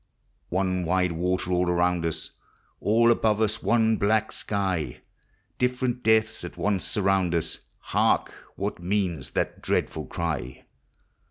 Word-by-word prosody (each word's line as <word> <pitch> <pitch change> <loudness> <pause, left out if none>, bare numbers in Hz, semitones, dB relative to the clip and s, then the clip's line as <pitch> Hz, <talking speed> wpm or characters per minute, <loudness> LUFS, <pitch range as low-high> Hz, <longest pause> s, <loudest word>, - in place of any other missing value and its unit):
One 90 0 0
wide 90 +1 +1
water 90 +2 -1
all 90 0 +2
around 90 -1 +2
us, 80 -1 -5 0.5
All 115 +3 +4
above 110 -2 +2
us 110 -1 0
one 115 -1 +3
black 110 +2 +2
sky; 95 - -2 0.6
Different 125 0 0
deaths 110 -1 +2
at - - -8
once 100 -2 0
surround 95 -3 +1
us: 80 -1 -2 0.3
Hark! - - +2 0.2
what 100 0 -3
moans 85 -7 -1
that - - -1
dreadful - - -1
cry? 75 -6 -4
95 Hz, 125 wpm, -26 LUFS, 85-110 Hz, 0.6 s, All